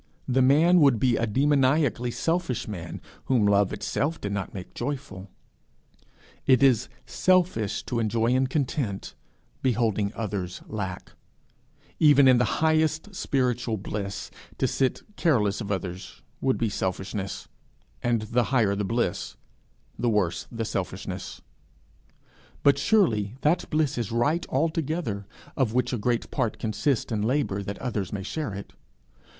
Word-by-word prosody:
The 130 Hz, +1 st, +2 dB
man 155 Hz, +7 st, +5 dB
would 140 Hz, -7 st, +5 dB
be 125 Hz, -1 st, +3 dB
a 115 Hz, -, 0 dB
demoniacally 135 Hz, 0 st, +2 dB
selfish 165 Hz, -1 st, -1 dB
man, 90 Hz, -5 st, -6 dB, 0.2 s
whom 120 Hz, -5 st, +3 dB
love 100 Hz, -1 st, +3 dB
itself 150 Hz, +4 st, -2 dB
did 100 Hz, -, -4 dB
not 100 Hz, -2 st, -3 dB
make 95 Hz, -2 st, -8 dB
joyful. 130 Hz, -9 st, -5 dB, 1.2 s
It 130 Hz, -1 st, +5 dB
is 130 Hz, -3 st, +4 dB, 0.2 s
selfish 180 Hz, -, +1 dB
to 120 Hz, -, -2 dB
enjoy 115 Hz, +1 st, +1 dB
in 130 Hz, +1 st, +3 dB
content 130 Hz, -7 st, -2 dB, 0.5 s
beholding 110 Hz, -5 st, +1 dB
others 100 Hz, -5 st, -4 dB
lack; 95 Hz, -4 st, -5 dB, 0.9 s
even 145 Hz, -3 st, +6 dB
in 130 Hz, -2 st, +6 dB
the 125 Hz, -, 0 dB
highest 160 Hz, +4 st, +1 dB
spiritual 125 Hz, -, 0 dB
bliss, 100 Hz, 0 st, -5 dB, 0.3 s
to -, -, +1 dB
sit 130 Hz, -1 st, 0 dB
careless 115 Hz, -, +2 dB
of 100 Hz, -1 st, -4 dB
others 90 Hz, -1 st, -5 dB, 0.2 s
would 130 Hz, -1 st, +2 dB
be 115 Hz, -, 0 dB
selfishness, 95 Hz, 0 st, -3 dB, 0.5 s
and 120 Hz, -2 st, +1 dB
the 120 Hz, +2 st, +1 dB
higher 115 Hz, -7 st, +2 dB
the 105 Hz, -, -1 dB
bliss, 115 Hz, -2 st, -1 dB, 0.6 s
the 120 Hz, -, +1 dB
worse 90 Hz, -6 st, 0 dB
the 115 Hz, -1 st, -3 dB
selfishness; -, -, -5 dB, 1.2 s
but 140 Hz, -1 st, +5 dB
surely 120 Hz, -, +2 dB
that 155 Hz, +4 st, +1 dB
bliss 150 Hz, -4 st, +1 dB
is 115 Hz, -3 st, -3 dB
right 145 Hz, +9 st, +1 dB
altogether 155 Hz, -, -1 dB, 0.3 s
of 125 Hz, -4 st, 0 dB
which 125 Hz, 0 st, +1 dB
a 120 Hz, -, -1 dB
great 120 Hz, +2 st, -1 dB
part 120 Hz, -6 st, -1 dB
consists 110 Hz, +4 st, -1 dB
in 110 Hz, -2 st, 0 dB
labour 115 Hz, -3 st, 0 dB
that 100 Hz, +1 st, -5 dB
others 105 Hz, -7 st, -3 dB
may 100 Hz, -2 st, -4 dB
share 135 Hz, -1 st, -4 dB
it. 100 Hz, -, -8 dB
120 Hz, 140 wpm, -26 LUFS, 105-140 Hz, 1.2 s, even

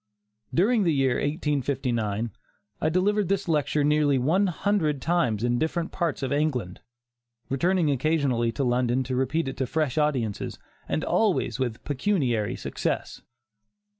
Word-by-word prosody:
During 215 Hz, +6 st, +3 dB
the 175 Hz, -4 st, +2 dB
year 135 Hz, -3 st, +2 dB
1859, 130 Hz, -7 st, -1 dB, 0.5 s
I 155 Hz, -, +2 dB
delivered 195 Hz, +3 st, +1 dB
this 195 Hz, -1 st, 0 dB
lecture 150 Hz, -2 st, +1 dB
nearly 150 Hz, -1 st, +3 dB
one 165 Hz, +11 st, +2 dB
hundred 175 Hz, -5 st, 0 dB
times 125 Hz, -9 st, 0 dB
in 120 Hz, 0 st, +1 dB
different 165 Hz, +2 st, -1 dB
parts 170 Hz, -7 st, -2 dB
of 130 Hz, -, -2 dB
England, 130 Hz, -11 st, -1 dB, 0.7 s
returning 170 Hz, +3 st, +2 dB
occasionally 135 Hz, -4 st, +1 dB
to 140 Hz, -, -1 dB
London 125 Hz, 0 st, +1 dB
to 130 Hz, 0 st, -3 dB
repeat 135 Hz, +5 st, 0 dB
it 135 Hz, -, -5 dB
to 130 Hz, -, -1 dB
fresh 155 Hz, -1 st, 0 dB
audiences, 130 Hz, -9 st, -1 dB, 0.3 s
and 155 Hz, -, 0 dB
always 210 Hz, -9 st, +1 dB
with 120 Hz, -4 st, -2 dB
pecuniary 130 Hz, -, 0 dB
success. -, -, -3 dB
145 Hz, 135 wpm, -26 LUFS, 125-165 Hz, 0.7 s, During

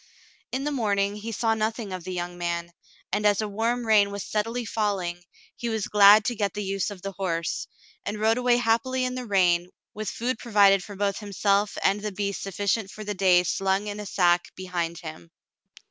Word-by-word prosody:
In 265 Hz, +1 st, -2 dB
the 295 Hz, -, -1 dB
morning 205 Hz, -5 st, 0 dB
he 220 Hz, +2 st, -6 dB
saw 225 Hz, +1 st, +1 dB
nothing 220 Hz, -2 st, -2 dB
of 185 Hz, -2 st, -6 dB
the 185 Hz, -, -5 dB
young 175 Hz, 0 st, -4 dB
man, 170 Hz, 0 st, -3 dB, 0.4 s
and 205 Hz, +1 st, +1 dB
as 205 Hz, -1 st, +3 dB
a 215 Hz, -, -1 dB
warm 230 Hz, +4 st, -1 dB
rain 210 Hz, -2 st, +5 dB
was 200 Hz, 0 st, -5 dB
steadily 230 Hz, +3 st, -2 dB
falling, 195 Hz, -5 st, -2 dB, 0.3 s
he 235 Hz, -, -4 dB
was 220 Hz, -3 st, -2 dB
glad 210 Hz, +1 st, +7 dB
to 245 Hz, -, +1 dB
get 205 Hz, -3 st, -1 dB
the 205 Hz, -, -3 dB
use 195 Hz, 0 st, -1 dB
of 195 Hz, -3 st, -10 dB
the 195 Hz, -, -4 dB
horse, 170 Hz, -4 st, -2 dB, 0.4 s
and 210 Hz, +1 st, -4 dB
rode 220 Hz, +3 st, +2 dB
away 245 Hz, -1 st, +3 dB
happily 245 Hz, +2 st, +1 dB
in 250 Hz, -, -2 dB
the 255 Hz, -1 st, -5 dB
rain, 180 Hz, -3 st, +2 dB, 0.3 s
mth 215 Hz, -1 st, -3 dB
food 240 Hz, 0 st, -2 dB
provided 200 Hz, -5 st, +4 dB
for 205 Hz, -, -9 dB
both 200 Hz, 0 st, -1 dB
himself 205 Hz, 0 st, 0 dB
and 200 Hz, +2 st, +2 dB
the 210 Hz, 0 st, -3 dB
beast 200 Hz, 0 st, -3 dB
sufficient 200 Hz, +2 st, -1 dB
for 215 Hz, -, -8 dB
the 205 Hz, 0 st, -3 dB
day 185 Hz, -2 st, +4 dB
slung 195 Hz, +3 st, 0 dB
in 205 Hz, 0 st, -5 dB
a 210 Hz, -, -6 dB
sack 175 Hz, -2 st, +3 dB
behind 175 Hz, -2 st, -3 dB
him. 155 Hz, -, -9 dB
205 Hz, 205 wpm, -26 LUFS, 190-220 Hz, 0.4 s, glad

